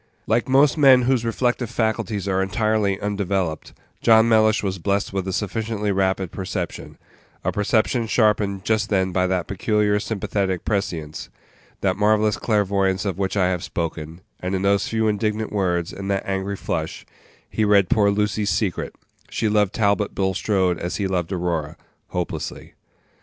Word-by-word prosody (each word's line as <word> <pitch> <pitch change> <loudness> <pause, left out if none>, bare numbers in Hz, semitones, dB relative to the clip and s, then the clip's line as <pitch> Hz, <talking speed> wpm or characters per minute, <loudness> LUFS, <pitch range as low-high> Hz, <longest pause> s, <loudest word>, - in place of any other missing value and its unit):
Like 120 - +1
most 140 +4 +4
men 130 -3 +7
whose 125 -1 +2
reflective 120 +1 0
faculties 110 -3 -1
are 95 -1 +1
entirely 105 0 0
undeveloped, 95 -5 -2 0.3
John 110 0 +6
Mellish 110 -1 +3
was 95 -2 -2
blessed 100 +3 -1
with 95 -1 -2
a - - -1
sufficiently 105 +1 -2
rapid 95 -2 0
perception 95 -2 -5 0.5
a - - 0
perception 110 +3 +1
sharpened 105 -4 +1
just 110 -2 +1
then 95 -2 +1
by 90 0 +1
that 90 -1 0
peculiar 105 +1 +1
sympathetic 100 -3 -2
prescience, 85 -7 -3 0.5
that 95 -2 +1
marvellous 105 0 +2
clairvoyance 100 -3 +1
of 95 -2 -2
which 95 +1 -1
I 90 -2 +3
have 90 -2 -2
spoken; 80 0 -4 0.2
and 90 +1 -2
in 95 - -2
those 100 0 +2
few 110 -1 0
indignant 105 0 -1
words, 90 -4 0
and 100 0 -6
that 100 -1 -1
angry 95 +1 -2
flush, 80 -4 -4 0.4
he 110 - -1
read 100 -3 +4
poor 100 +1 +3
Lucy's 105 0 0
secret; 90 +1 -1 0.3
she 110 - -1
loved 105 -2 +2
Talbot 105 -2 0
Bulstrode 95 -2 0
as 90 - -3
he 100 - -1
loved 90 -2 -1
Aurora 85 -4 -2 0.3
hopelessly. 90 -1 -5
100 Hz, 155 wpm, -22 LUFS, 95-110 Hz, 0.5 s, men